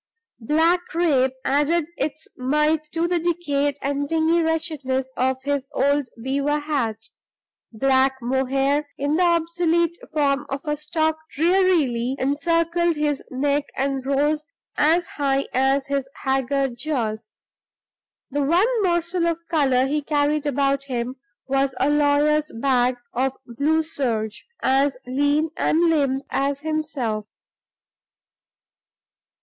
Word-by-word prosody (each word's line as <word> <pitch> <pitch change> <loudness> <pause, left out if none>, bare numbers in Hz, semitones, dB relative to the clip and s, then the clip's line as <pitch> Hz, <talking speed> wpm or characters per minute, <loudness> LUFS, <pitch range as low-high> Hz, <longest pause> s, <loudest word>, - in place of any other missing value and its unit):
Black 325 +8 +2
crape 280 -7 +2
added 295 +4 +2
its 305 -1 -4
mite 300 +4 +1
to 330 +1 0
the 350 0 +1
decayed 290 -5 0
and 285 +1 -1
dingy 325 +1 +2
wretchedness 305 -5 -1
of 260 0 +1
his 285 -1 -1
old 285 -1 +1 0.2
beaver 280 +3 0
hat; 280 -8 -1 0.7
black 265 +3 +2
mohair 270 +3 0
in 285 +2 0
the - - +2
obsolete 340 0 +1 0.2
form 285 -2 +1
of 275 0 -3
a 300 -1 0
stock 315 +1 -1 0.2
drearily 310 -8 +2
encircled 335 +4 +1
his 295 -2 -1
neck 280 +2 0
and 270 0 -1
rose 290 +3 +1 0.3
as 330 +4 +3
high 275 -1 -1
as 270 +1 +2
his 275 -1 -2
haggard 270 -1 0
jaws. 225 -7 -3 1.0
The 290 +2 0
one 385 - +2
morsel 345 -1 +1
of 335 -1 0
color 265 -5 +3
he 295 +2 0
carried 295 0 0
about 275 0 +1
him 250 0 -3 0.3
was 270 0 0
a 280 +3 +2
lawyer's 295 +1 +2
bag 250 -1 +2 0.2
of 265 +2 0
blue 290 +7 +1
serge, 230 -9 -3 0.2
as 270 0 +2
lean 290 +4 +1
and 315 - +1
limp 275 -3 +1
as 275 +1 0
himself. 295 -9 -2
285 Hz, 120 wpm, -23 LUFS, 265-315 Hz, 1.0 s, as